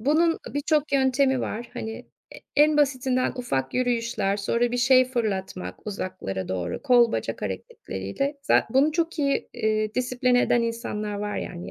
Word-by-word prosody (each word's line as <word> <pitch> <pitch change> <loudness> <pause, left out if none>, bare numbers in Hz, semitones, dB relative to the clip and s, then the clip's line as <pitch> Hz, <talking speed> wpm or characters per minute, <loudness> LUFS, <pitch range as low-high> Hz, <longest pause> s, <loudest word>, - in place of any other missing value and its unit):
bunun 320 +7 +2 0.2
birçok 295 +1 +1
yöntemi 265 -1 +3
var. 235 +2 -4
Hani, 225 -2 -6 0.3
e - - -9 0.2
en 300 +1 +5
basitinden 260 -3 +1
ufak 135 - -2
yürüyüşler. 235 -5 0
Sonra, 235 +4 0
bir - - 0
şey 255 +1 +5
fırlatmak 205 -9 -3
uzaklara 185 - -4
doğru. 90 -2 -3
Kol 240 -2 +5
bacak 115 0 -3
hareketleriyle 100 - -4
zat - - +2
bunu 275 +6 +3
çok 330 0 -1
iyi, 280 -2 0
iii, 215 -2 -1
disipline 250 0 +2
eden 240 - +2
insanlar 215 -2 -3
var 205 0 -3
yani 175 0 -6
240 Hz, 150 wpm, -25 LUFS, 205-265 Hz, 0.3 s, en